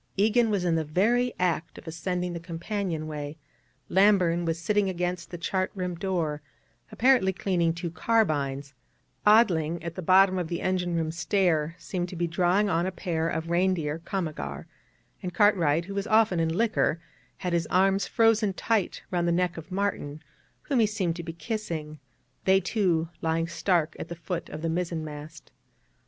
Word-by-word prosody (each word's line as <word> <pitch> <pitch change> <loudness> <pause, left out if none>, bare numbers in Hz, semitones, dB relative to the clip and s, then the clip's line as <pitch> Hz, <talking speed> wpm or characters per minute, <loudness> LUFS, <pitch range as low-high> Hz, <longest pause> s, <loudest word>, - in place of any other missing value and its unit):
Egan 225 +3 +3
was 200 -4 0
in 170 - +2
the 160 -1 +1
very 230 +11 +2
act 175 -2 -1
of - - -12
ascending 180 +2 -3
the 170 - -4
companion 170 0 -3
way; 150 0 -6 0.5
Lamburn 185 -3 +3
was 165 0 0
sitting 200 +3 +1
against 180 -1 -3
the 175 - -6
chart 185 +2 -1
room 180 -2 -2
door, 170 -5 -2 0.5
apparently 250 -6 +4
cleaning 180 -3 0
two 170 0 -5
carbines; 145 -10 0 0.5
Odling 175 -7 +4
at 170 -1 -4
the 185 - -6
bottom 185 +2 +5
of 175 - -2
the 170 0 -3
engine 180 -2 0
room 160 -1 -1
stair 165 -1 +1
seemed 175 +1 -4
to 180 - -8
be 175 0 0
drawing 180 +4 +2
on 175 -1 +1
a - - -2
pair 165 -3 -2
of 165 +1 -3
reindeer 170 -4 +1
komagar; 155 - -4 0.6
and 180 -1 -5
Cartwright, 170 -6 +3
who 200 - -7
was 200 +1 -2
often 215 -5 +3
in 165 0 +1
liquor, 195 -3 +1 0.4
had 180 -2 -3
his 170 -1 +1
arms 195 +2 +2
frozen 225 -3 +3
tight 215 0 -1
round 175 -1 0
the - - +2
neck 175 0 +1
of 165 +3 -10
Martin, 185 -6 -2 0.4
whom 275 -4 0
he 220 - +4
seemed 190 -6 -1
to 170 - -5
be 170 0 -6
kissing, 165 -5 -5 0.5
they 190 0 +5
two 180 -4 0
lying 165 0 0
stark 170 -2 0
at - - -5
the 170 - -6
foot 170 +1 -5
of 155 +1 -7
the - - 0
mizzen 165 -1 -2
mast. 150 +1 -10
175 Hz, 175 wpm, -27 LUFS, 165-195 Hz, 0.6 s, bottom